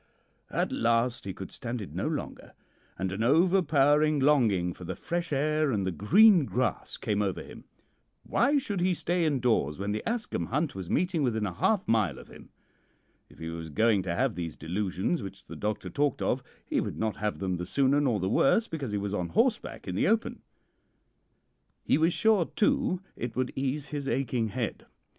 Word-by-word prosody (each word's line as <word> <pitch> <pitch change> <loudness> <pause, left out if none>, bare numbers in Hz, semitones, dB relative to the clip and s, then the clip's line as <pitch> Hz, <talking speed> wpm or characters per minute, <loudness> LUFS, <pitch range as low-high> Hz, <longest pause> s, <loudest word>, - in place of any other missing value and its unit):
At - - -1
last 115 0 +1
he 95 - -4
could 95 - -8
stand 120 0 -5
it 100 - -8
no - - -2
longer, - - -5 0.4
and 95 0 -2
an 95 +3 -3
overpowering 150 0 +4
longing 115 -11 +3
for 90 - -12
the 85 - -4
fresh 170 -1 -3
air 150 +1 +1
and 100 -5 0
the 95 - 0
green 175 - +5
grass 125 0 -2
came 105 -2 -1
over 95 -3 -2
him. - - -12 0.6
Why 285 +1 +2
should 205 -9 -2
he 180 0 +2
stay 175 +1 0
indoors 120 - +1
when 100 +2 -2
the 105 - -2
Ascombe 220 - -2
Hunt 150 +4 -1
was 95 -3 -7
meeting 180 -3 +1
within 110 -5 0
half 175 - 0
a - - +1
mile 110 -3 +2
of - - -12
him? - - -14 0.8
If - - -18
he 80 0 -6
was 80 -1 -6
going 105 +6 +3
to 90 -2 -3
have 130 +1 +1
these 85 -4 -5
delusions 95 - -2
which 95 -1 -9
the - - -9
doctor 105 0 -3
talked 145 0 0
of, - - 0 0.2
he - - 0
would - - -4
not 110 -1 -1
have 105 -1 -2
them 95 -2 -2
the 90 - -4
sooner 140 +4 +2
nor 125 -7 +1
the 95 - -1
worse 175 - +3
because 140 -9 -4
he - - +1
was 100 0 -3
on 90 -4 -2
horseback - - 0
in 90 - -3
the 95 - +1
open. 225 +2 0 1.4
He - - +2
was 165 +2 +3
sure, 215 -3 +3
too, 255 -5 +1
it 120 -2 -5
would 130 0 -1
ease 140 +2 -2
his 145 -2 -4
aching 125 -4 0
head. 115 +1 -4
125 Hz, 195 wpm, -28 LUFS, 100-155 Hz, 1.4 s, green